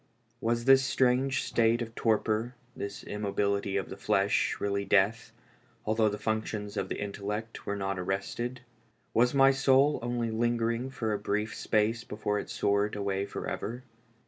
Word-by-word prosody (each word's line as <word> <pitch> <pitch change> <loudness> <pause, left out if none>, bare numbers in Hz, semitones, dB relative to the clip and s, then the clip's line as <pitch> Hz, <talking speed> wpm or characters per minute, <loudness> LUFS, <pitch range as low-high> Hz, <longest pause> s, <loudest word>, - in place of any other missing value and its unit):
" 115 +1 -41
Was 120 0 -1
this 135 0 +7
strange 130 0 +2
state 115 0 +2
of 115 -2 -5
torpor, 110 +1 0 0.2
this 100 +1 -6
immobility 100 -1 -1
of 95 - -3
the - - -6
flesh, 100 0 +1
really 100 0 -1
death, 100 +3 +2 0.5
although 110 0 +2
the 105 - -4
functions 110 -1 -3
of - - -2
the - - -3
intellect 105 +2 -5
were 100 - -1
not 95 -1 -2
arrested? 120 +7 -3 0.5
W 115 - +3
as 125 +3 0
my 135 0 +7
soul 135 +2 +3
only 120 -1 -1
linger 115 0 +1
ing 120 +3 -3
for 110 -5 -2
a 105 - -1
brief 105 +1 -1
space 110 +2 0
before 105 -1 -2
it - - -7
soared 100 +1 +1
away 100 -1 -1
forever? 120 +4 -5
110 Hz, 165 wpm, -29 LUFS, 100-120 Hz, 0.5 s, this